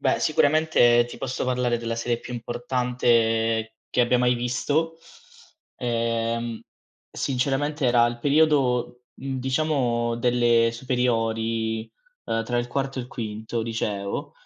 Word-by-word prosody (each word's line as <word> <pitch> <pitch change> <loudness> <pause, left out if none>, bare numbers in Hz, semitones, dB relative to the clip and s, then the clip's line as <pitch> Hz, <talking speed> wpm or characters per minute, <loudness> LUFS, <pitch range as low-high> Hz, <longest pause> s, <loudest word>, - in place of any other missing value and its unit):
Beh, - - +2
sicuramente 145 -6 +4
ti - - -9
posso 130 - -3
parlare 125 -1 +1
della 115 0 -3
serie 120 0 -1
più 125 - -8
importante 115 -2 0
che - - +1
abbia 120 +1 +3
mai 125 0 +3
visto. 145 +7 -1 0.8
Ehm, 115 -1 -1 0.5
sinceramente 140 +3 -1
era 120 -1 +5
il 120 0 -3
periodo, 140 -4 +2
mhmm, 135 0 -5
diciamo 130 -4 0
delle 120 -1 +3
superiori, 115 -2 -1 0.3
uhm, 115 0 -1
tra 120 +1 -1
il 120 0 -2
quarto 135 +1 -2
e - - -4
il 120 - -11
quinto 110 -2 -4
liceo, 105 -3 -3
120 Hz, 125 wpm, -24 LUFS, 115-130 Hz, 0.8 s, era